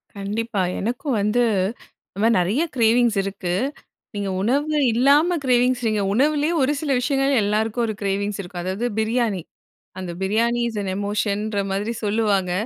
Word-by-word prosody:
கண்டிப்பா. 205 Hz, +1 st, -2 dB, 0.2 s
எனக்கும் 250 Hz, +5 st, -2 dB
வந்து 210 Hz, +4 st, +2 dB, 0.7 s
இந்தமாரி 225 Hz, +3 st, +3 dB
நிறைய 200 Hz, -, 0 dB
கிரேவிங்ஸ் 235 Hz, -1 st, +3 dB
இருக்கு! 195 Hz, -2 st, -3 dB, 0.6 s
நீங்க 200 Hz, -1 st, -2 dB
உணவு 285 Hz, +8 st, +1 dB, 0.2 s
இல்லாம 290 Hz, +8 st, +4 dB
கிரேவிங்ஸ், 250 Hz, 0 st, +3 dB
நீங்க 210 Hz, -2 st, 0 dB
உணவுலயே 295 Hz, +6 st, +2 dB
ஒரு 265 Hz, +2 st, +2 dB
சில 300 Hz, -3 st, -1 dB
விஷயங்கள் 270 Hz, +2 st, +1 dB
எல்லாருக்கும் 220 Hz, +3 st, 0 dB
ஒரு 220 Hz, -, -3 dB
கிரேவிங்ஸ் 200 Hz, +1 st, -1 dB
இருக்கும். 175 Hz, -1 st, -7 dB
அதாவது 190 Hz, +6 st, -2 dB
பிரியாணி! 220 Hz, -3 st, 0 dB, 0.6 s
அந்த 185 Hz, -2 st, -5 dB
பிரியாணி 230 Hz, +5 st, +1 dB
இஸ் 225 Hz, -, -7 dB
அன் 195 Hz, -, -3 dB
எமோஷன்ற 205 Hz, +1 st, -1 dB
மாதிரி 205 Hz, +4 st, -1 dB
சொல்லுவாங்க! 205 Hz, -3 st, +1 dB
220 Hz, 135 wpm, -22 LUFS, 200-245 Hz, 0.7 s, இல்லாம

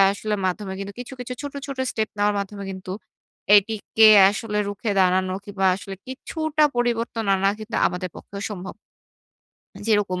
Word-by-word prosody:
আ -, -, +8 dB
আসলে 210 Hz, +1 st, -3 dB
মাধ্যমে 190 Hz, +1 st, -3 dB
কিন্তু 200 Hz, +1 st, -6 dB
কিছু, 250 Hz, +2 st, -8 dB
কিছু 250 Hz, 0 st, -5 dB
ছোট, 285 Hz, -1 st, -6 dB
ছোট 275 Hz, -2 st, -6 dB
স্টেপ 220 Hz, -1 st, -1 dB
নেওয়ার 205 Hz, 0 st, +2 dB
মাধ্যমে 200 Hz, 0 st, -5 dB
কিন্তু 185 Hz, -1 st, -7 dB, 0.6 s
এটিকে 220 Hz, +1 st, +4 dB, 0.2 s
আসলে 210 Hz, +1 st, -3 dB
রুখে 205 Hz, +2 st, -3 dB
দাঁড়ানো 185 Hz, 0 st, +2 dB
কিংবা 200 Hz, -2 st, -1 dB
আসলে 195 Hz, 0 st, -8 dB
কিছুটা 310 Hz, +3 st, -1 dB
পরিবর্তন 235 Hz, -2 st, 0 dB
আনা 195 Hz, 0 st, +2 dB
কিন্তু 215 Hz, +2 st, -5 dB
আমাদের 180 Hz, 0 st, -3 dB
পক্ষেও 200 Hz, 0 st, -8 dB
সম্ভব। 190 Hz, -2 st, -6 dB, 1.1 s
যেরকম, 205 Hz, -4 st, +1 dB
205 Hz, 155 wpm, -23 LUFS, 195-230 Hz, 1.1 s, আ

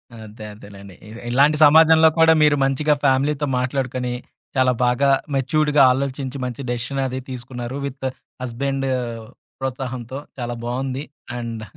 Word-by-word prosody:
అదే 110 Hz, -1 st, -10 dB
అదేనండి. 100 Hz, -2 st, -13 dB
ఇ -, -, -12 dB, 0.2 s
ఇలాంటి 140 Hz, +5 st, +4 dB
సమాజంలో 160 Hz, +1 st, +7 dB
కూడా 160 Hz, 0 st, +7 dB
మీరు 150 Hz, -1 st, +5 dB
మంచిగా 145 Hz, +3 st, +2 dB
ఫ్యామిలీతో 140 Hz, +2 st, +2 dB
మాట్లాడుకొని 125 Hz, -1 st, -2 dB, 0.4 s
చాలా 130 Hz, -1 st, +4 dB
బాగా 125 Hz, +3 st, +2 dB, 0.3 s
మెచ్యూర్డ్‌గా 150 Hz, +2 st, +2 dB
ఆలోచించి 135 Hz, 0 st, -3 dB
మంచి 125 Hz, +2 st, -5 dB
డెసిషన్ 125 Hz, +3 st, -2 dB
అది 130 Hz, 0 st, -4 dB
తీసుకున్నారు. 125 Hz, 0 st, -6 dB
విత్ 135 Hz, -1 st, -6 dB, 0.4 s
హస్బాండ్ 135 Hz, +2 st, -2 dB, 0.7 s
ప్రోత్సాహంతో 130 Hz, -1 st, -4 dB, 0.2 s
చాలా 120 Hz, 0 st, -3 dB
బావుంది. 130 Hz, +3 st, -3 dB, 0.4 s
అండ్ 115 Hz, -2 st, -5 dB
130 Hz, 120 wpm, -21 LUFS, 120-140 Hz, 0.7 s, సమాజంలో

